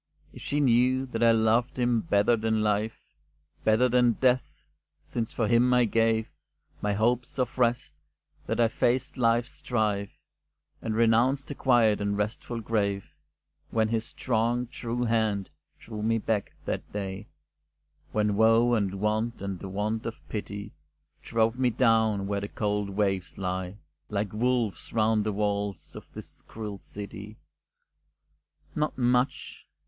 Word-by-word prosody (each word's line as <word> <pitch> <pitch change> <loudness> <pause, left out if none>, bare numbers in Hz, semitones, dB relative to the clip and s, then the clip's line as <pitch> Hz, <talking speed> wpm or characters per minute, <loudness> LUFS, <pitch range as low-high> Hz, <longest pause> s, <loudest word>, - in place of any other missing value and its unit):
If - - -11
she 145 - -1
knew 130 0 +3
that 120 -3 -5
I 115 0 +6
loved 115 +2 +2
him 120 -2 +2
better 100 +4 +3
than 110 -1 0
life, 105 +1 0 0.6
Better 110 +4 +4
than 125 -1 +4
death; 130 +1 0 0.4
since 115 -2 -3
for 115 - -1
him 120 +2 +4
I 125 -1 +5
gave 115 0 +2 0.5
My 105 0 0
hopes 120 +5 0
of 130 0 -2
rest, 120 -10 +1 0.5
that - - -1
I 115 - +5
faced 120 +3 0
life's 120 +1 +2
strife, 105 -4 -2 0.6
And 110 - -2
renounced 115 +5 +3
the - - -3
quiet 120 -6 +3
and 100 0 -1
restful 110 +3 -3
grave, 100 -3 -1 0.6
When 110 -1 +1
his 115 -1 0
strong, 120 +1 -1
true 120 0 -4
hand 110 -5 0 0.3
drew 110 -2 -8
me 115 +1 +2
back 110 -2 -1
that - - -4
day, 100 0 -5 0.8
When 105 -1 +1
woe, 115 +3 +4
and 100 -4 0
want, 110 +3 0
and 100 -2 -4
the 95 - -7
want 105 +4 -2
of 115 - -4
pity 105 -1 -5 0.5
Drove 115 +1 0
me 125 -1 +3
down 110 -4 +2
where 100 0 -2
the 100 - -3
cold 105 -1 -1
waves 95 -2 -1
lay 95 0 -3 0.3
Like 100 -1 -2
wolves 120 -2 -1
round 110 -1 +2
the 105 - -1
walls 100 -1 -2
of - - -11
this - - -10
cruel 105 -3 -6
city. 105 +2 -9 1.4
"Not 150 0 -1
much?" 125 +1 0
110 Hz, 145 wpm, -27 LUFS, 105-120 Hz, 1.4 s, I